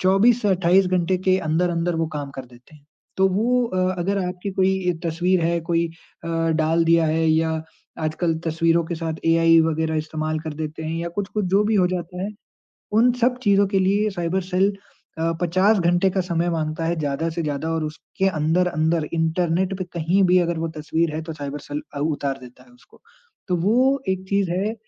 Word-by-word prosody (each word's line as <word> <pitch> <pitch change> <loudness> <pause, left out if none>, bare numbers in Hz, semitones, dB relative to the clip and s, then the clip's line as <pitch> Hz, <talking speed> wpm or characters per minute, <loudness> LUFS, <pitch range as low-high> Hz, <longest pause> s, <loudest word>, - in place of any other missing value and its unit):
24 210 +6 +4
से 205 - +2
28 185 0 +3
घंटे 180 0 +1
के 185 0 +5
अंदर-अंदर 170 +1 0
वो 165 0 0
काम 140 -1 -5
कर 130 - -6
देते 125 +5 -19
हैं। 145 - -23 0.3
तो 190 0 +4
वो 240 +6 +1
अ, 185 -3 0
अगर 195 +3 0
आपकी 180 +2 -5
कोई 190 -1 +1
तस्वीर 175 +3 +1
है, 170 0 +1
कोई 170 0 0 0.4
अ, - - -5 0.3
डाल 165 +1 +2
दिया 165 -1 +4
है 160 +1 +1
या 160 0 +1 0.4
आजकल 160 +2 0
तस्वीरों 165 +1 +2
के 170 - -4
साथ 160 -1 -3
एआई 165 0 +5
वगैरह 160 0 0
इस्तेमाल 155 0 -2
कर 155 -1 -6
देते 155 +1 -5
हैं 160 +1 -3
या 170 0 -3
कुछ-कुछ 205 +1 -2
जो 205 - +5
भी 215 +1 +1
हो 185 -3 +4
जाता 180 0 -4
है, 200 - -2 0.6
उन 235 +3 +4
सब 250 +1 +2
चीज़ों 200 -2 +4
के 195 0 0
लिए 200 +3 +2
साइबर 175 0 -1
सेल 195 +2 +2 0.5
अ, 165 +1 0
50 185 +5 +3
घंटे 175 +2 +2
का 190 - 0
समय 175 -1 -1
माँगता 160 -1 -2
है 170 +1 0
ज़्यादा 145 +2 -1
से 165 +1 -3
ज़्यादा 150 +1 -3
और 160 -1 -1
उसके 160 +5 -3
अंदर-अंदर 160 -1 +1
इंटरनेट 170 +3 0
पे 185 - -2
कहीं 170 +4 +2
भी 180 0 +5
अगर 170 -1 -1
वो 165 0 -2
तस्वीर 155 +1 -1
है 155 - -2
तो 160 0 -6
साइबर 145 -1 -6
सेल 145 +1 -5
अ, - - -4
उतार 145 -2 -1
देता 125 -1 -14
है 245 - -22
उसको। 245 - -22 0.5
तो 180 - +1
वो 250 +10 +2
एक 190 0 -1
चीज़ 200 -3 +1
है, 200 +5 -1
170 Hz, 200 wpm, -22 LUFS, 160-190 Hz, 0.6 s, के